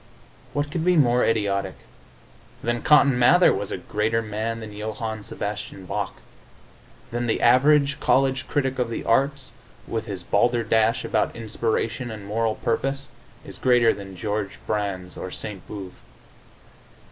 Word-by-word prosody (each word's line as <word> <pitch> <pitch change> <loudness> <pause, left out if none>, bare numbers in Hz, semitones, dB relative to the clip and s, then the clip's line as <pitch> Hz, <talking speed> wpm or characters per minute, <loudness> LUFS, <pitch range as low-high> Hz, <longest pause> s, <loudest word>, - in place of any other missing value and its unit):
What 145 0 -1
could 160 0 -2
be 180 +1 +4
more 125 -4 +4
idiotic? 100 -4 0 0.9
Then 120 0 -1
Cotton 140 -4 +5
Mather 120 - +6
was - - -3
a - - -2
greater 110 +2 -1
man 110 +2 -3
than 110 -2 -8
Johann 110 +1 -4
Sebastian 100 -2 -6
Bach. - - -3 1.0
Then 120 +1 -2
the 110 - +1
average 140 +3 +4
college 130 0 +2
critic 135 -2 -1
of 125 -2 0
the 115 - -4
arts, 135 +1 +1 0.3
with 115 0 -3
his 95 -4 -5
balderdash 115 +2 +2
about - - 0
inspiration 115 +2 -2
and 105 -3 -7
moral 110 +1 0
purpose, 135 +4 -2 0.4
is - - -10
greater 120 -3 +4
than 95 -2 -9
Georg 105 +1 -2 0.2
Brandes 100 -4 -3
or 95 - -5
Saint 100 0 -7
Beuve. 95 -3 -7
115 Hz, 140 wpm, -24 LUFS, 105-130 Hz, 1.0 s, Mather